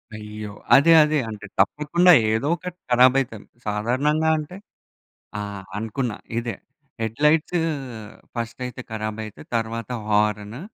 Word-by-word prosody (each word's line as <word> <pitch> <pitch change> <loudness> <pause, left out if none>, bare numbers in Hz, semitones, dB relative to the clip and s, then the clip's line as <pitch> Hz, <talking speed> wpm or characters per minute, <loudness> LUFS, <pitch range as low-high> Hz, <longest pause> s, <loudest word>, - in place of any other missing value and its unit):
అయ్యో! 105 0 -7 0.2
అదే, 145 +5 +7
అదే 150 0 +1
అంటే 105 -2 -8
తప్పకుండా 150 - +4 0.2
ఏదో 115 +5 0
ఒకటి 180 +1 -8
కరాబయితది. 125 -3 +3 0.2
సాధారణంగా 130 +10 +1
అంటే 155 +4 -6 0.8
ఆ! - - -2 0.4
అనుకున్నా 115 +1 -3 0.2
ఇదే 120 -1 -4 0.5
హెడ్‌లైట్స్ 150 +10 +2 0.8
ఫస్టయితే 120 +2 -5
కరాబయితయి. 110 -1 -5
తరువాత 115 +1 -2 0.2
హారన్. 105 +2 +1
115 Hz, 100 wpm, -23 LUFS, 110-150 Hz, 0.8 s, అదే